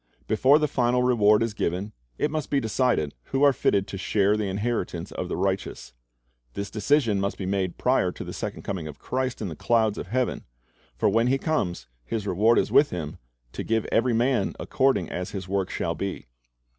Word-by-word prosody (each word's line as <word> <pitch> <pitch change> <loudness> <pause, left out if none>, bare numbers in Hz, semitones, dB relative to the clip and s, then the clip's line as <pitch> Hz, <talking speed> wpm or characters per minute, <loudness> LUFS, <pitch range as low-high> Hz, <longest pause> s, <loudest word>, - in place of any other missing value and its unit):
Before 130 +7 +4
the 155 -1 +1
final 125 -2 +1
reward 110 -3 +4
is 115 -2 -2
given, 95 +2 -2 0.2
it 150 - 0
must 155 -1 -3
be 140 - +2
decided 110 - 0
who 135 +1 0
are 140 -1 +6
fitted 100 -5 +1
to 95 -1 -7
share 100 +1 +2
the 105 -1 -1
inheritance 100 -4 -2
of 90 - -4
the - - -2
righteous. 95 -7 -2 0.6
This 100 0 -4
decision 115 -1 +2
must 100 +1 -2
be 95 - -4
made 95 -2 -1
prior - - +2
to - - -7
the - - -7
second - - -5
coming 90 -5 -4
of 75 - -9
Christ 130 -3 -3
in - - -2
the 80 - -6
clouds 110 +3 +1
of - - -6
heaven; 125 +4 -1 0.5
for - - +1
when 115 +4 +3
He 135 +2 +3
comes, 135 - -1 0.2
His 105 - -3
reward 105 +5 +3
is - - +1
with 145 - +5
Him, 80 -4 -5 0.3
"to - - -5
give 110 -1 0
every 120 +1 +2
man 125 +3 +1
according 130 - +1
as 90 0 -4
his 95 -3 -6
work 95 -1 -1
'shall 85 - -2
be."' 95 +4 -4
105 Hz, 200 wpm, -25 LUFS, 95-125 Hz, 0.6 s, are